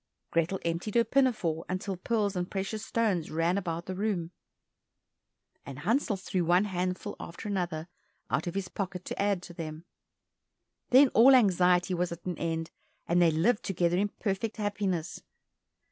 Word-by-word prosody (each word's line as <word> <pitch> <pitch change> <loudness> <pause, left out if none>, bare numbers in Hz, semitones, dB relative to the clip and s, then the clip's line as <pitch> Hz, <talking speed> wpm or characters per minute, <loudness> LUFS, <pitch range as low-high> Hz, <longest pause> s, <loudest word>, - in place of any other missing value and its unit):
Grethel 170 +3 +1
emptied 170 +6 -2
her 235 - +6
pinafore 225 - +1
until 185 +1 -2
pearls 205 +1 -1
and 180 0 -2
precious 200 +2 -3
stones 205 -8 0
ran 165 +3 +1
about 170 -3 -3
the 185 - -4
room, 185 -4 -2 1.3
and 140 -2 -8
Hansel 215 - 0
threw 185 -1 -2
one 175 +3 +4
handful 185 0 -3
after 170 +6 -8
another 175 -5 -2 0.4
out - - -1
of 175 - -4
his 195 -2 -2
pocket 185 -1 -5
to - - -3
add 200 -3 +1
to 175 - -10
them. 160 -1 -7 1.0
Then 265 +2 +7
all 255 +5 +7
anxiety 180 -5 +4
was 180 0 -1
at 170 0 -8
an 180 -3 -3
end, 165 0 -2 0.4
and 175 +1 +3
they 170 - +6
lived 185 +9 +2
together 175 -2 +1
in 205 +2 +1
perfect 205 +2 -3
happiness. 195 -5 -2
185 Hz, 160 wpm, -29 LUFS, 170-205 Hz, 1.3 s, Then